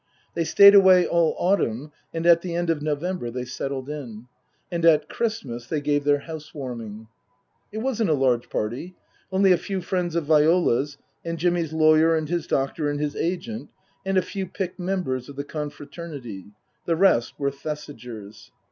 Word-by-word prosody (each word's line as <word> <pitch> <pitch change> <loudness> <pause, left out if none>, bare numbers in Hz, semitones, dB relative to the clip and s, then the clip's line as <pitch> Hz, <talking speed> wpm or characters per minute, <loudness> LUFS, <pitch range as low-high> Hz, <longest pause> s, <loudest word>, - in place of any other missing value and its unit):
They 165 - -1
stayed 200 +4 +8
away 190 -2 +7
all 170 -2 +2
autumn, 150 - 0 0.2
and 165 0 -4
at 170 -1 +6
the 175 -1 -4
end 175 -1 +1
of 155 -3 -2
November 155 -1 -2
they 125 +1 -5
settled 130 +1 -4
in. 125 -7 -7 0.5
And 170 -1 -2
at 165 -2 +5
Christmas 130 - -3
they 155 - -1
gave 145 0 0
their 145 -1 +3
house 160 0 -9
warming. 115 -6 -7 0.6
It 220 +1 -4
wasn't 230 -7 0
a 155 - +4
large 125 -3 +1
party 125 +12 -4 0.4
only 190 0 +4
a 180 - +4
few 195 -2 -3
friends 180 -2 -2
of 170 -3 0
Viola's, 150 -3 +3 0.3
and 165 0 -4
Jimmy's 170 -1 0
lawyer 160 +1 +4
and 155 -1 -1
his 170 0 -2
doctor 140 +3 0
and 145 0 -2
his 150 -1 -2
agent, 185 +7 -3 0.3
and 195 0 0
a 185 - +3
few 195 -1 -5
picked 185 0 -5
members 175 -9 -2
of 140 - -10
the 140 - -4
confraternity; 145 - -7 0.4
the 165 - +2
rest 160 -10 +3
were 140 -1 0
Thesigers. 125 -8 -8
155 Hz, 175 wpm, -24 LUFS, 140-175 Hz, 0.6 s, stayed